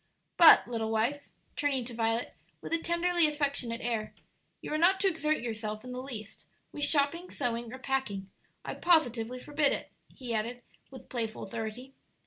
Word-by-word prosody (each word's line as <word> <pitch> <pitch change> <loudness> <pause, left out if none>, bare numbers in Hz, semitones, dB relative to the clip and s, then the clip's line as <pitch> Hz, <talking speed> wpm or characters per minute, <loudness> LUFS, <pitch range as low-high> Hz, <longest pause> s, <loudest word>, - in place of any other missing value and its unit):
"But, 335 -8 +9
little 225 -2 -2
wife," 235 +6 -1 0.3
turning 275 -4 0
to 240 - -7
Violet, 225 +1 -1 0.3
with - - -6
a 330 - +3
tenderly 340 0 +2
affectionate 280 -6 -1
air, 225 -3 -2 0.4
"you - - -6
are - - +1
not 375 +3 +4
to 400 - +3
exert 310 -6 0
yourself 215 -2 -4
in 250 - -8
the 250 0 -5
least 220 -6 -8 0.2
with 290 - +1
shopping, 305 +5 +1
sewing, 235 -3 -2
or 260 - -7
packing. 250 -8 -3 0.3
I - - -3
positively 250 -8 +2
forbid 290 +2 +1
it," - - -5 0.2
he 250 -4 -5
added, 235 +3 -2 0.3
with 265 - -12
playful 225 -3 -3
authority. 230 +5 -6
250 Hz, 165 wpm, -30 LUFS, 225-295 Hz, 0.4 s, But